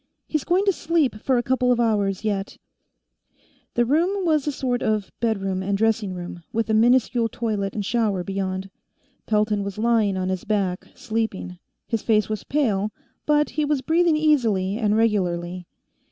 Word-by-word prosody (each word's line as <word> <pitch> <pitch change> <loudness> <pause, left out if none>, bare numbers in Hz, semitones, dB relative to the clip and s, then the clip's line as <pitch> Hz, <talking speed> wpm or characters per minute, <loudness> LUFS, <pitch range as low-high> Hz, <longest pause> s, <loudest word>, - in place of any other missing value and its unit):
"He's 310 -3 -1
going 370 +3 +2
to 395 - +4
sleep 315 -9 0
for 260 -2 +2
a 240 - +1
couple 255 0 +2
of 240 - +2
hours, 205 -4 +1
yet." 200 -2 -2 1.2
The 240 - +3
room 355 +9 +1
was 310 -3 +2
a - - +2
sort 250 -3 -2
of 215 -2 -1
bedroom 195 -5 -1
and 195 +1 -1
dressing 215 -3 +1
room, 175 -1 -7
with 225 0 -1
a - - +2
miniscule 235 +1 +3
toilet 210 -4 -2
and 205 -2 -2
shower 210 -5 0
beyond. 190 0 -3 0.6
Pelton 210 -1 +1
was 200 0 -5
lying 220 -3 +2
on 185 0 -1
his 185 -1 -2
back, 195 -4 -1
sleeping; 215 -6 -3 0.3
his 225 -2 -1
face 215 -2 +2
was 215 -1 -3
pale, 215 -8 0 0.4
but 295 0 +3
he 305 - -1
was 295 -2 0
breathing 325 +2 +3
easily 225 -11 +2
and 210 -2 +2
regularly. 180 -5 0
220 Hz, 170 wpm, -23 LUFS, 195-255 Hz, 1.2 s, to